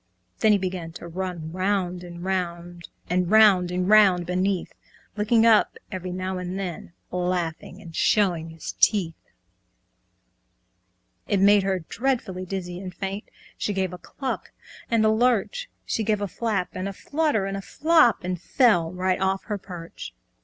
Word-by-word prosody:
Then 220 - +4
he 205 - +5
began 180 -3 -4
to 170 - -9
run 175 -2 -5
round 185 -1 -1
and 175 -1 -9
round, 175 -2 -3 0.2
And 180 0 0
round 205 -4 +6
and 180 +1 -1
round 195 -4 +5
beneath, 185 +1 -1 0.4
Looking 225 +2 +3
up 225 -2 +4
every 185 -2 -5
now 185 +1 -3
and 180 +1 -4
then, 180 -3 -5 0.2
Laughing 180 0 -2
and 170 -5 -11
showing 175 -6 +2
his 160 -1 -7
teeth. 185 -7 +3 2.1
It 200 -3 +1
made 200 +1 +6
her 190 -3 -1
dreadfully 235 -8 -2
dizzy 180 -2 -4
and 185 -1 -6
faint, 195 +2 -5 0.3
She 205 - -1
gave 190 -2 -1
a 180 - -8
cluck 265 +6 -5 0.4
and 225 -2 +3
a - - +5
lurch, 250 - +1 0.2
She 225 - -1
gave 210 -1 +1
a 205 - -2
flap 195 -1 -2
and 185 +2 -3
a - - -6
flutter 290 -3 0
and 195 0 -4
flop, 310 -5 +3
And 180 -1 -3
fell 175 -9 +3
right 185 +1 -1
off 190 0 0
her 210 -3 -4
perch. 175 - -9
190 Hz, 155 wpm, -25 LUFS, 180-210 Hz, 2.1 s, round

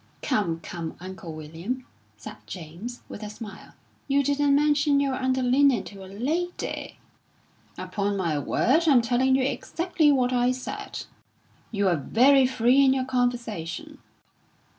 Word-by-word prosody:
'" - - -35
"Come, 190 - 0
come, 165 -2 -6
Uncle 185 -1 -8
William," 165 +12 -5 0.3
said - - -9
James, 185 +8 -8
with - - -9
a 210 - -5
smile. 210 -1 -10 0.3
"You 280 0 +2
didn't 285 0 +2
mention 290 -1 +3
your 275 -1 +1
underlinen 260 -1 +2
to 195 -2 -10
a - - -10
lady!" 305 - -3 0.8
"Upon 200 -1 -2
my 165 -6 0
word, 305 - +2
I'm 260 -6 +5
telling 255 +2 +2
you 265 - +2
exactly 325 +3 +1
what 255 -2 +2
I 245 0 +2
said." 255 0 -6 0.6
"You're 200 -5 +1
very 260 - +4
free 255 +2 +4
in 265 -1 +5
your 260 -1 -1
conversation." 245 - -2
250 Hz, 140 wpm, -26 LUFS, 200-275 Hz, 0.8 s, I'm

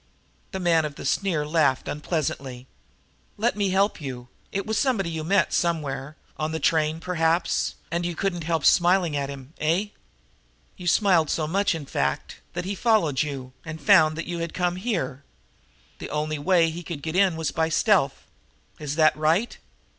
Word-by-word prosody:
The 190 - -4
man 170 -3 +3
of 150 -2 -4
the - - -8
sneer 165 0 0
laughed 150 -4 +1
unpleasantly. 140 -5 -3 0.7
"Let 230 +3 +1
me 200 -2 0
help 195 -1 +1
you. 125 -3 -7 0.2
It 195 - -2
was 220 0 0
somebody 220 -11 +1
you 160 -1 -4
met 190 +1 +2
somewhere 150 -4 -1 0.2
on 155 0 -2
the 160 - -2
train, 160 0 +1
perhaps, 165 0 0 0.2
and 170 +1 -1
you 175 -1 -2
couldn't 175 -3 -2
help 165 -2 0
smiling 175 -3 +4
at 140 -1 -2
him, 140 +1 -9
eh? 170 +7 +1 0.9
You 180 - -8
smiled 175 -4 +4
so 155 - 0
much, 195 +3 +1
in 155 -3 -6
fact, 70 - -2
that 175 +1 -4
he 195 - -2
followed 195 - +2
you 135 -4 -5
and 160 -1 -7
found 155 +2 +5
that 165 - -3
you 175 -1 -4
had 170 -1 -4
come 180 0 0
here. 170 - -2 0.8
The - - -6
only 150 0 -2
way 170 0 +3
he 170 +2 -6
could 165 -4 -7
get 160 +1 -3
in 190 -3 +4
was 160 -3 -2
by 160 +2 0
stealth. 170 -6 +2 0.5
Is 150 -1 -4
that 155 -1 +4
right? 160 +9 +1
165 Hz, 175 wpm, -25 LUFS, 150-180 Hz, 0.9 s, found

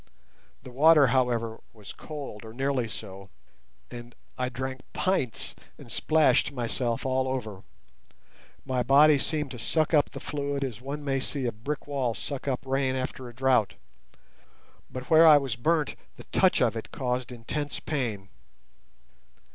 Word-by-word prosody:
The 130 - -10
water, 150 +3 +6
however, 120 -3 0
was 105 -4 -11
cold, 140 -9 -8
or 110 0 -10
nearly 135 -1 0
so, 95 -3 -8 0.6
and 120 -1 -9 0.2
I 125 0 -1
drank 130 +1 -5
pints 185 - -1 0.2
and - - -12
splashed 155 -4 +3
myself 120 -2 -2
all 130 0 +1
over. 110 -7 -4 1.0
My 130 -2 0
body 145 +3 +6
seemed 150 -1 -2
to 125 - -7
suck 155 +6 0
up 150 -2 +4
the - - -8
fluid 140 -1 -3
as 125 -4 -5
one 145 +3 -5
may 135 -1 0
see 135 0 -3
a 120 - 0
brick 120 +8 -5
wall 135 -5 -1
suck 140 -1 -5
up 135 0 -2
rain 135 0 0
after 130 -1 -4
a 120 - -14
drought; 130 -5 +2 1.1
but 130 +2 -8
where 160 +1 +8
I 150 -2 +9
was 135 -5 -2
burnt 155 +5 +1 0.2
the - - -12
touch - - +4
of - - +1
it - - -6
caused 125 0 -2
intense 140 +5 -4
pain. 110 -10 -3
130 Hz, 155 wpm, -27 LUFS, 120-145 Hz, 1.1 s, I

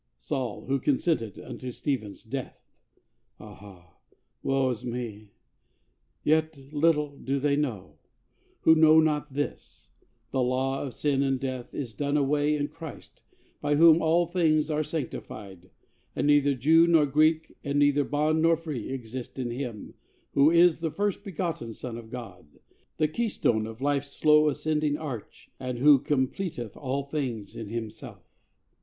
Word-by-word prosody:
Saul 120 - -4
who 135 +1 0
consented 130 - 0
unto 130 -1 -7
Stephen's 120 -6 -4
death! 130 +3 -6 0.8
Ah, 100 -5 -14 0.4
woe 135 -1 +1
is 115 - -5
me! 115 -4 -5 0.9
Yet 155 0 +2 0.2
little 150 -1 +2
do 135 +1 -1
they 140 +1 +1
know, 100 - -3 0.6
Who 160 - +6
know 160 0 +6
not 150 -2 0
this: 145 0 -5 0.4
the 130 - 0
law 130 +2 0
of 135 -4 -5
sin 140 -2 +1
and 135 -1 +1
death 130 -2 -5
Is 125 -6 -4
done 145 +4 0
away 145 +1 +2
in 145 -1 -1
Christ, 160 0 -11 0.4
by 145 - +1
Whom 165 +1 +7
all 165 +2 +3
things 160 -3 +1
Are 155 0 +1
sanctified; 100 - -6 0.5
and - - 0
neither 145 -1 +4
Jew 160 +6 +5
nor 165 -3 +5
Greek, 155 +3 +2
And 140 0 -1
neither 145 0 +4
bond 155 +2 +1
nor 165 0 +4
free, 150 -9 -5
exist 125 -1 -6
in 125 -2 -3
Him 120 -4 -6 0.4
Who 140 +2 +5
is 170 0 +5
the 165 -1 -1
First 200 +4 -2
Begotten 165 - -4
Son 120 -3 -6
of 115 -1 -9
God, 115 -10 -9 0.5
The 155 - +2
Keystone 150 - 0
of 115 +2 -10
life's 140 0 0
slow 150 0 +4
ascending 150 0 0
arch, 135 -9 -8
And 125 -1 -4
Who 140 +2 +6
completeth 130 - -2
all 140 0 -3
things 130 -8 -4
in 110 -3 -6
Himself. 110 -1 -7
140 Hz, 150 wpm, -27 LUFS, 120-155 Hz, 0.9 s, Whom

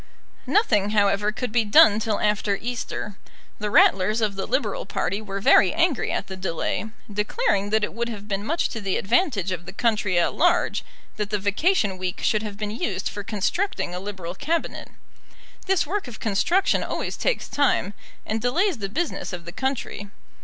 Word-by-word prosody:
Nothing, 210 - +3
however, 205 +1 +3
could 245 +1 -4
be 235 0 +3
done 210 0 +6
till 220 -2 -1
after 210 -1 +1
Easter. 225 -3 -4 0.4
The 210 - -2
Ratlers 205 +2 +4
of 210 -3 0
the 195 - -3
Liberal 275 - -1
party 200 +2 -1
were 200 -2 -5
very 190 -1 +5
angry 335 -7 +1
at - - -2
the 190 - -7
delay, 185 +3 -2 0.3
declaring 210 - 0
that 220 0 +2
it - - -2
would 235 +1 -2
have 210 -3 -7
been 200 -1 -2
much 325 +10 0
to 225 - -5
the 195 -2 0
advantage 225 - +1
of 175 -1 -5
the - - -6
country 215 -6 +1
at 175 - +2
large 350 +1 +2 0.3
that 210 -1 -2
the 210 - 0
vacation 205 - +1
week 185 -1 -3
should 215 - +2
have 210 -2 -6
been 210 -1 -3
used 195 -4 -2
for 205 - -6
constructing 210 - -1
a 180 - -3
Liberal 190 -3 -6
Cabinet. 320 - -2 0.8
This 385 -2 +2
work 385 +1 -3
of 240 - -9
construction 335 - +2
always - - -3
takes - - -1
time, 270 -8 +1 0.3
and 220 +1 -2
delays 335 - +1
the 195 -1 -3
business 320 - -3
of 175 -1 -6
the 170 - -7
country. 260 -4 -3
210 Hz, 180 wpm, -24 LUFS, 195-250 Hz, 0.8 s, done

